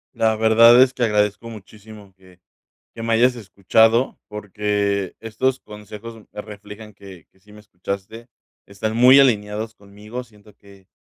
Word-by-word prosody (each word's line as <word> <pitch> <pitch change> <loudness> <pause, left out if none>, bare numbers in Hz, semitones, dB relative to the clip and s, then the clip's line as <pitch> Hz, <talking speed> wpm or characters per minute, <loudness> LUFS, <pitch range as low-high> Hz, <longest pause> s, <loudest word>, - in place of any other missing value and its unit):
La 110 -1 +1
verdad 115 +2 +5
es 130 0 +4
que 125 - -3
agradezco 105 0 -1
muchísimo 105 -1 -14
que 95 -1 -22 0.6
que 115 - -8
me 115 0 -1
hayas 125 +2 +3
escuchado, 110 +3 +1
porque 105 -2 -3
estos 130 +4 -2
consejos 105 +2 -11 0.2
me 105 - -8
reflejan 105 +1 -12
que 95 -4 -15
que 95 - -32
sí 105 +2 -22
me 105 - -15
escuchaste. 100 +3 -8 0.4
Están 105 +2 -5
muy 125 +3 +6
alineados 110 -3 0
conmigo, 105 +5 -10
siento 105 -2 -21
que 100 -1 -21
105 Hz, 145 wpm, -20 LUFS, 100-115 Hz, 0.6 s, muy